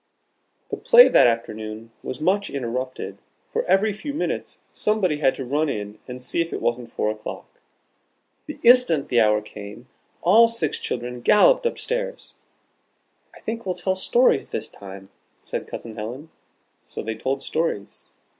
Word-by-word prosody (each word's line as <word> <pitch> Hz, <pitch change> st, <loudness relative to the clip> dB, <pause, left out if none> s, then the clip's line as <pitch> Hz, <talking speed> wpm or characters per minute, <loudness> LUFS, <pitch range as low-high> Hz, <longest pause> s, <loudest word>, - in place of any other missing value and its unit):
The -, -, -2 dB
play -, -, +7 dB
that -, -, +6 dB
afternoon 110 Hz, -1 st, -3 dB
was -, -, -6 dB
much 195 Hz, +5 st, +1 dB
interrupted, 130 Hz, 0 st, -4 dB, 0.3 s
for 475 Hz, +1 st, 0 dB
every 205 Hz, +2 st, +3 dB
few 285 Hz, +8 st, -6 dB
minutes 315 Hz, -, -3 dB
somebody 200 Hz, -8 st, 0 dB
had 135 Hz, -3 st, +2 dB
to 135 Hz, -, -5 dB
run 150 Hz, +4 st, 0 dB
in 105 Hz, -2 st, -5 dB
and 125 Hz, 0 st, -8 dB
see 125 Hz, -, -1 dB
if 165 Hz, -, -3 dB
it -, -, -3 dB
wasn't 120 Hz, 0 st, -2 dB
four 105 Hz, -, 0 dB
o'clock. 110 Hz, 0 st, -9 dB, 0.9 s
The -, -, -7 dB
instant 235 Hz, -, +5 dB
the 120 Hz, -, +3 dB
hour 105 Hz, -1 st, +3 dB
came, 105 Hz, +3 st, -10 dB, 0.4 s
all 220 Hz, +7 st, +7 dB
six 230 Hz, -10 st, -1 dB
children 125 Hz, 0 st, -4 dB
galloped 480 Hz, -, +5 dB
up -, -, -3 dB
stairs. -, -, -3 dB, 1.0 s
"I -, -, -15 dB
think 230 Hz, +1 st, -4 dB
we'll 185 Hz, -3 st, -2 dB
tell 185 Hz, +2 st, -1 dB
stories 480 Hz, -, +2 dB
this -, -, -3 dB
time," 95 Hz, 0 st, -11 dB, 0.3 s
said -, -, -4 dB
Cousin 115 Hz, -2 st, -8 dB
Helen. 125 Hz, +9 st, -7 dB, 0.6 s
So -, -, -6 dB
they 110 Hz, -, -3 dB
told 130 Hz, +5 st, -3 dB
stories. 155 Hz, -11 st, -3 dB
140 Hz, 155 wpm, -23 LUFS, -, 1.0 s, play